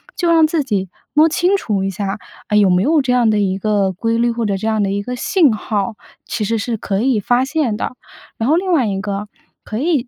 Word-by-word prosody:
就 345 -2 +1
让 325 -2 +5
自 315 -1 0
己 200 -7 -2 0.2
摸 310 +2 +5
清 355 +5 +2
楚 205 - -2
一 195 - -1
下， 195 0 -3 0.3
哎， 210 - +2
有 205 -2 +5
没 180 0 +3
有 300 +7 +3
这 250 -1 +1
样 245 -3 +3
的 210 -1 +2
一 190 -2 0
个 205 -2 +1
规 230 +5 -1
律， 235 +1 +2
或 230 -1 -2
者 200 -1 0
这 215 - -3
样 220 -1 +1
的 200 - 0
一 200 0 -2
个 250 +3 -4
信 295 - +3
号， 215 +1 -2 0.3
其 220 - -3
实 225 +2 0
是 225 +2 -2
可 200 -1 -2
以 250 -3 +2
发 245 +5 +1
现 270 -7 -1
的。 - - -3 0.5
然 230 +3 0
后 310 - +4
另 370 +2 0
外 275 -9 +3
一 195 -2 -2
个， 200 0 -4 0.4
可 215 - -5
以 280 -2 0
225 Hz, 270 characters per minute, -18 LUFS, 205-270 Hz, 0.5 s, 让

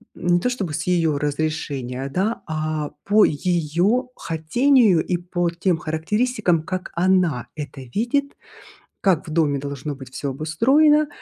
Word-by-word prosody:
м, 175 - -6
не 175 0 +4
то 250 - 0
чтобы 195 -11 -3
с - - -2
её 165 -5 +1
разрешения, 140 -3 -3
да, 205 +5 0
а 155 -1 -2
по 210 +1 +5
её 175 - 0
хотению 195 - +3
и 180 - -1
по 175 0 -1
тем 170 +1 0
характеристикам, 175 +4 0
как 185 +2 -5
она 175 -7 +1
это 145 -3 -7
видит, 240 - -1 0.7
как 180 -5 +2
в 155 - -7
доме 150 -4 +2
должно 140 +1 -5
быть 130 -2 -11
всё 140 - -3
обустроено, 270 - +3
170 Hz, 145 wpm, -22 LUFS, 150-205 Hz, 0.7 s, по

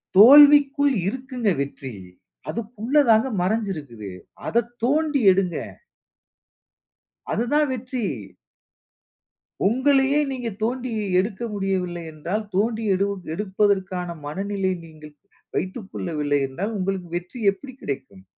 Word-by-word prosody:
தோல்விக்குள் 285 +4 +8
இருக்குங்க 255 -1 -2
வெற்றி. 140 -2 -5 0.6
அதுக்குள்ள 235 +6 0
தாங்க 220 +3 +5
மறஞ்சுருக்குது. 160 - -3 0.4
அதத் 235 0 0
தோண்டி 295 +2 +2
எடுங்க. 185 -2 0 1.7
அதுதான் 290 +6 +1
வெற்றி! 255 -1 -4 1.6
உங்களையே 270 +4 +3
நீங்க 245 -3 -3
தோண்டி 245 +2 -2 0.3
எடுக்க 200 +1 -2
முடியவில்லை 185 -3 -2
என்றால், 175 +8 -3
தோண்டி 220 +3 0
எடு 195 +2 +1 0.3
எடுப்பதற்கான 190 -2 0
மனநிலை 195 +4 -2
நீங்கள் 155 -2 -13 0.4
வைத்துக்கொள்ளவில்லை 165 -8 -2
என்றால், 200 +11 -4
உங்களுக்கு 185 -2 -2
வெற்றி 180 +8 -8
எப்படி 260 +6 -11
கிடைக்கும்? 130 -9 -6
205 Hz, 90 wpm, -23 LUFS, 180-250 Hz, 1.7 s, தோல்விக்குள்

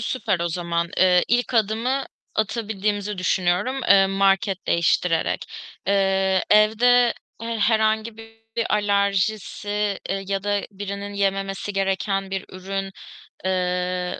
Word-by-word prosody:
süper 190 -8 -1
o 170 - 0
zaman. 170 0 -2
Eee, 180 -1 +4
ilk 245 +1 +1
adımı 230 +5 +1 0.3
atabildiğimizi 210 -2 -2
düşünüyorum, 185 +8 0
eee, 195 0 +7
market 195 0 +1
değiştirerek. 170 0 +1 0.4
Eee, 195 -1 +2
evde 235 +3 +5 0.3
he 230 -1 -3
herhangi 220 +1 +1
bir 225 0 -12 0.4
alerjisi, 205 0 0
eee, 195 0 -2
ya 195 -1 -2
da 205 0 +1
birinin 200 0 -6
yememesi 195 0 -1
gereken 195 0 -1
bir 195 -1 -3
ürün, 195 +1 -5 0.5
eee, 180 -1 -1
195 Hz, 110 wpm, -23 LUFS, 190-215 Hz, 0.5 s, eee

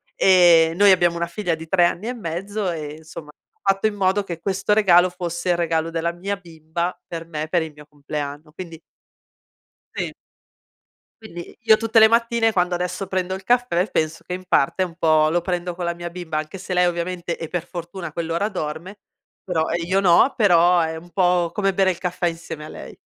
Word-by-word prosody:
e 170 -3 +5
noi 200 +1 +6
abbiamo 175 -2 +3
una 170 0 -1
figlia 175 -2 -2
di 160 0 -10
3 175 0 +4
anni 190 +5 -2
e 250 - -2
mezzo 195 +1 -3
e 150 -2 -6
insomma 160 -1 -11
ha 195 +5 -2
fatto 195 - -5
in 215 - -3
modo 195 +1 +1
che 170 -3 -6
questo 195 +3 0
regalo 185 -4 +5
fosse 175 0 -4
il 175 - +3
regalo 165 -1 0
della 165 +1 -1
mia 195 +3 -4
bimba 170 0 -5
per 165 -1 -7
me, 155 -1 -4
per 175 -1 +2
il 160 -2 -6
mio 150 0 -14
compleanno. 145 +1 -6
Quindi 165 -2 -9 1.2
Sì. - - -3 1.1
Quindi 175 -5 -10
io 220 -1 +6
tutte 225 0 -1
le 220 0 +9
mattine 230 0 +2
quando 180 -2 +1
adesso 180 +2 -3
prendo 185 -1 -2
il 190 0 -6
caffè 240 -6 +1
penso 155 +1 -2
che 180 - -6
in 185 0 -6
parte 180 +4 +2
un 170 -2 -6
po' 155 -2 +3
lo 175 +2 +1
prendo 180 0 -3
con 175 0 -6
la 170 0 -2
mia 175 0 -7
bimba, 170 -3 -5
anche 155 +5 -5
se 185 0 -4
lei 180 0 +4
ovviamente 175 0 -3
e 165 - -5
per 175 0 -4
fortuna 175 +1 -7
a 155 - -10
quell'ora 170 +5 -2
dorme, 175 +2 -6 0.4
però 165 -4 0
io 175 +3 0
no, 190 +8 +4
però 175 -4 +5
è 160 0 -2
un 170 +2 -11
po' 180 -2 +2
come 195 -2 +1
bere 190 0 +3
il 180 - -2
caffè 180 0 -2
insieme 165 -2 -6
a - - -10
lei. - - -10
175 Hz, 205 wpm, -22 LUFS, 165-190 Hz, 1.2 s, le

